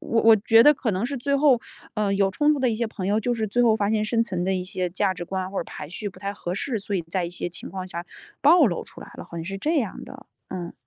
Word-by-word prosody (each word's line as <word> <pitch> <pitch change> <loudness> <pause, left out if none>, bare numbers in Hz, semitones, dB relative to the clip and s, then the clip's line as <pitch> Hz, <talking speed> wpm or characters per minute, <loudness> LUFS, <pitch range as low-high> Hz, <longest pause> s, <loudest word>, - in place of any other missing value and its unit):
我 230 - +1
我 225 0 +8
觉 225 +2 +5
得 295 +2 +7
可 240 -4 -1
能 190 +5 -1
是 280 +1 -4
最 280 +3 0
后 270 -5 +4 0.3
呃， 210 -2 0
有 195 -1 +2
冲 295 +8 +3
突 290 - -1
的 255 - +3
一 220 - -1
些 235 0 -1
朋 190 -3 -5
友 210 +2 +2
就 245 +3 0
是 220 -1 -1
最 245 +4 +1
后 225 -2 +5
发 205 -1 0
现 215 -1 +1
生 230 +1 +1
存 185 -6 -3
的 190 - +1
一 180 - -2
些 185 -1 -3
价 190 +1 0
值 175 0 -6
观 185 +1 -3
或 195 - -8
者 - - -2
排 150 - -8
序 205 +5 -5
不 185 - -14
太 200 0 -3
合 175 -2 -4
适， 230 +2 -2
所 200 0 -4
以 185 - +1
在 175 +2 -2
一 170 - -4
些 175 - -4
情 175 - -8
况 185 -1 -5
下 175 -1 -6 0.4
暴 310 0 +7
露 175 - -2
出 - - -12
来 - - -10
了， - - -8
好 170 - -10
像 165 - -5
是 195 +3 -4
这 315 +9 0
样 220 -7 -3
的， - - -12 0.2
嗯。 175 -2 -5
200 Hz, 330 characters per minute, -24 LUFS, 185-235 Hz, 0.4 s, 我